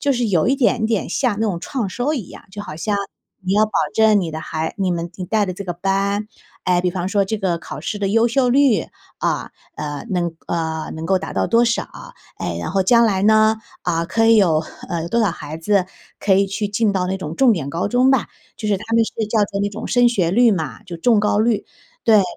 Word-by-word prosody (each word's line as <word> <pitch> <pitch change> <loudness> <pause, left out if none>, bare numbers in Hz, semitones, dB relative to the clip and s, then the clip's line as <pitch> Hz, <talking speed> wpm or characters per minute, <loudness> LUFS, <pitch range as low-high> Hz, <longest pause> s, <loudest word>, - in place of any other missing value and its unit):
就 285 - +2
是 245 -2 0
有 175 -2 +2
一 270 - +2
点 240 -4 +2
点 220 -3 -1
像 245 -7 0
那 225 - +2
种 180 -5 -2
创 230 +1 -3
收 245 +9 -1
一 235 -9 -5
样， - - -11
就 205 - -6
好 185 -7 -7
像 205 +5 -1 0.5
你 185 0 -1
要 215 +1 +5
保 215 - -15 0.2
证 220 -2 +5
你 170 -3 -3
的 160 - -4
孩 160 0 -4
你 190 -2 +1
们 170 -1 -3
你 185 - -4
带 210 +3 +1
的 185 - -3
这 200 - -6
个 175 - -3
班 195 +3 0 0.4
哎， 180 -1 +2
比 180 - +1
方 180 0 -3
说 200 0 +2
这 215 +3 -3
个 185 -4 0
考 145 -3 -8
试 205 +6 -4
的 200 -1 -1
优 225 +3 +3
秀 250 +2 +2
率 255 - +3 0.3
啊， - - -1 0.3
呃， 145 +4 -5
能 175 -3 -1
呃， 160 -2 -2
能 160 +1 -5
够 190 +1 +2
达 - - -6
到 - - 0
多 230 +1 +4
少。 235 0 0 0.5
诶， 85 - -3
然 - - -4
后 195 0 +2
将 235 +4 +5
来 195 -3 0
呢， 215 +1 +5 0.3
啊， 165 0 0
可 225 +6 +1
以 225 0 +6
有， 165 -7 +3 0.3
呃， 170 -1 -3
多 230 - 0
少 215 -4 +2
孩 155 -2 -7
子 185 +3 +1 0.3
可 195 - +3
以 195 +1 +3
去 200 +2 -3
进 205 +1 +1
到 185 -2 0
那 190 +1 -1
种 160 -4 -6
重 260 -3 +5
点 150 -8 -3
高 170 +6 -1
中 250 +4 +3
吧。 265 -2 +2 0.3
就 215 - -4
是 205 - +2
他 190 - -9
们 230 - +5
是 - - -7 0.2
叫 225 - +2
作 200 -1 -2
那 205 - +1
种 215 +2 -6
升 245 -1 +4
学 180 -8 +1
率 235 +5 +5
嘛， 175 0 -3
就 180 -5 -8
重 225 +5 +3
高 210 0 +1
率， 220 -1 +1 0.4
对， 215 -3 +6
200 Hz, 265 characters per minute, -20 LUFS, 175-225 Hz, 0.5 s, 以